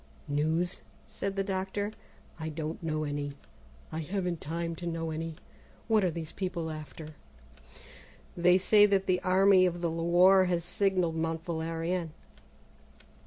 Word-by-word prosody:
"News?" 160 Hz, +5 st, 0 dB, 0.2 s
said 195 Hz, 0 st, -4 dB
the 195 Hz, -, 0 dB
doctor; 195 Hz, +1 st, -2 dB, 0.5 s
"I 160 Hz, 0 st, -3 dB
don't 155 Hz, +1 st, -5 dB
know 155 Hz, -2 st, -1 dB
any; 145 Hz, -1 st, -3 dB, 0.6 s
I 160 Hz, -, -3 dB
haven't 180 Hz, 0 st, -2 dB
time 165 Hz, +2 st, -3 dB
to 175 Hz, -, -5 dB
know 165 Hz, -1 st, -2 dB
any. 160 Hz, 0 st, -4 dB, 0.5 s
What 220 Hz, -3 st, +3 dB
are 185 Hz, -, +3 dB
these 160 Hz, -1 st, -6 dB
people 180 Hz, -4 st, -3 dB
after?" 155 Hz, 0 st, -8 dB, 1.2 s
"They 180 Hz, +1 st, +5 dB
say 205 Hz, +2 st, +6 dB
that 195 Hz, -1 st, +2 dB
the 180 Hz, -1 st, +1 dB
Army 185 Hz, 0 st, +5 dB
of 175 Hz, -1 st, -3 dB
the 170 Hz, -2 st, 0 dB
Loire 175 Hz, +3 st, +5 dB
has 175 Hz, -2 st, -1 dB
signalled 180 Hz, -3 st, +1 dB
Mont 165 Hz, 0 st, -2 dB
Valérien." 165 Hz, +1 st, -2 dB
170 Hz, 140 wpm, -30 LUFS, 160-185 Hz, 1.2 s, say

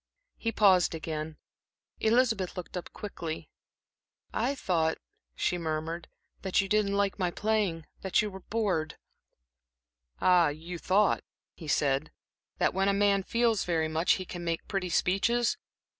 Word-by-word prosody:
He 230 Hz, -, -1 dB
paused 190 Hz, -6 st, +4 dB
again. 155 Hz, -1 st, -4 dB, 0.6 s
Elizabeth 220 Hz, -5 st, +2 dB
looked 180 Hz, -, -6 dB
up 180 Hz, -, -5 dB
quickly. 165 Hz, -6 st, -6 dB, 0.8 s
"I 280 Hz, -, 0 dB
thought," 165 Hz, -9 st, +1 dB, 0.4 s
she 180 Hz, -, 0 dB
murmured, 160 Hz, +1 st, -3 dB, 0.3 s
"that 190 Hz, -2 st, +1 dB
you 195 Hz, -, +2 dB
didn't 200 Hz, -1 st, +2 dB
like 200 Hz, 0 st, 0 dB
my 180 Hz, -2 st, +1 dB
playing, 200 Hz, -5 st, 0 dB, 0.2 s
that 190 Hz, -, +1 dB
you 210 Hz, -1 st, +1 dB
were 190 Hz, -, -8 dB
bored" 185 Hz, -7 st, -1 dB, 1.2 s
"Ah, 180 Hz, -2 st, +5 dB
you 165 Hz, +4 st, -5 dB
thought," 200 Hz, +4 st, +2 dB, 0.3 s
he 160 Hz, -, -10 dB
said, 140 Hz, 0 st, +1 dB, 0.5 s
"that -, -, +2 dB
when 195 Hz, +1 st, +2 dB
a -, -, +3 dB
man 200 Hz, 0 st, +3 dB
feels 230 Hz, +1 st, +1 dB
very 160 Hz, -2 st, 0 dB
much, 160 Hz, +3 st, +2 dB
he 185 Hz, -, -3 dB
can 175 Hz, -1 st, -7 dB
make 165 Hz, -1 st, -2 dB
pretty 190 Hz, -3 st, -2 dB
speeches? 230 Hz, +8 st, +2 dB
185 Hz, 145 wpm, -29 LUFS, 165-205 Hz, 1.2 s, Ah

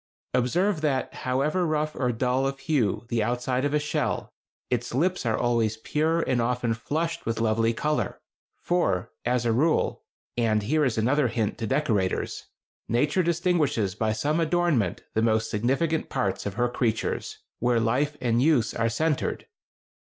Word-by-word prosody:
Observe 170 Hz, +9 st, +1 dB
that, 135 Hz, -4 st, 0 dB
however 140 Hz, +8 st, 0 dB
rough 155 Hz, -2 st, 0 dB
or 125 Hz, -2 st, 0 dB
dull 125 Hz, +3 st, +1 dB
of 135 Hz, 0 st, -3 dB
hue 125 Hz, -, 0 dB
the 120 Hz, -2 st, +1 dB
outside 125 Hz, +3 st, 0 dB
of 145 Hz, -, +1 dB
a -, -, +5 dB
shell, 150 Hz, 0 st, -2 dB, 0.4 s
its -, -, -1 dB
lips 175 Hz, -1 st, +1 dB
are 110 Hz, -, +1 dB
always 115 Hz, -2 st, +1 dB
pure 160 Hz, +8 st, 0 dB
and 125 Hz, -2 st, +1 dB
often 120 Hz, -1 st, 0 dB
flushed 165 Hz, +8 st, -2 dB
with 115 Hz, 0 st, -1 dB
lovely 115 Hz, 0 st, +2 dB
color; 150 Hz, +6 st, -1 dB, 0.4 s
for, 100 Hz, -, 0 dB
as 120 Hz, 0 st, +1 dB
a 115 Hz, -, +3 dB
rule 155 Hz, +8 st, +1 dB, 0.3 s
(and 110 Hz, -3 st, +1 dB
here 150 Hz, +8 st, +2 dB
is 125 Hz, -5 st, 0 dB
another 130 Hz, +5 st, +2 dB
hint 110 Hz, -2 st, -1 dB
to 115 Hz, -, -2 dB
decorators), 105 Hz, -8 st, 0 dB, 0.4 s
Nature 145 Hz, -, +2 dB
distinguishes 165 Hz, -, +1 dB
by 110 Hz, +2 st, 0 dB
some 145 Hz, +9 st, 0 dB
adornment 160 Hz, -, +1 dB
the 110 Hz, -, +1 dB
most 110 Hz, -1 st, +1 dB
significant 135 Hz, +9 st, 0 dB
parts 100 Hz, 0 st, -1 dB
of 100 Hz, -, -5 dB
her 120 Hz, +1 st, +2 dB
creatures, 120 Hz, -2 st, -2 dB, 0.2 s
where 120 Hz, 0 st, +2 dB
life 135 Hz, +6 st, 0 dB
and 120 Hz, -1 st, +1 dB
use 135 Hz, -6 st, +3 dB
are 115 Hz, 0 st, +1 dB
centered.... 150 Hz, +5 st, -1 dB
125 Hz, 160 wpm, -26 LUFS, 115-150 Hz, 0.4 s, a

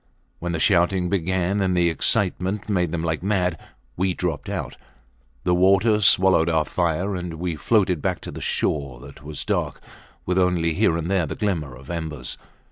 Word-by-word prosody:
When 85 Hz, 0 st, -3 dB
the 80 Hz, -, -1 dB
shouting 90 Hz, 0 st, +2 dB
began 95 Hz, +2 st, 0 dB
and 95 Hz, -2 st, +1 dB
the 85 Hz, -1 st, +3 dB
excitement 95 Hz, +2 st, 0 dB
made 90 Hz, -6 st, 0 dB
them 85 Hz, -1 st, -2 dB
like 80 Hz, -1 st, -1 dB
mad 90 Hz, -4 st, 0 dB, 0.4 s
we 95 Hz, 0 st, 0 dB
dropped 85 Hz, -6 st, -3 dB
out. -, -, -4 dB, 0.7 s
The 90 Hz, -, +2 dB
water 100 Hz, +4 st, +4 dB
swallowed 95 Hz, -4 st, +4 dB
our 80 Hz, -2 st, +2 dB
fire, 90 Hz, +3 st, -1 dB
and 90 Hz, -2 st, -5 dB
we 85 Hz, 0 st, -3 dB
floated 90 Hz, 0 st, +1 dB
back -, -, -1 dB
to -, -, -7 dB
the -, -, -8 dB
shore 70 Hz, -5 st, -1 dB
that -, -, -12 dB
was 75 Hz, -1 st, -6 dB
dark -, -, -1 dB, 0.5 s
with 90 Hz, +1 st, +1 dB
only 90 Hz, -3 st, +2 dB
here 80 Hz, +1 st, +2 dB
and 85 Hz, -, -3 dB
there 90 Hz, -2 st, +1 dB
the -, -, -5 dB
glimmer 80 Hz, -, -2 dB
of 65 Hz, +4 st, -10 dB
embers. 80 Hz, -6 st, -5 dB
90 Hz, 180 wpm, -23 LUFS, 80-95 Hz, 0.7 s, water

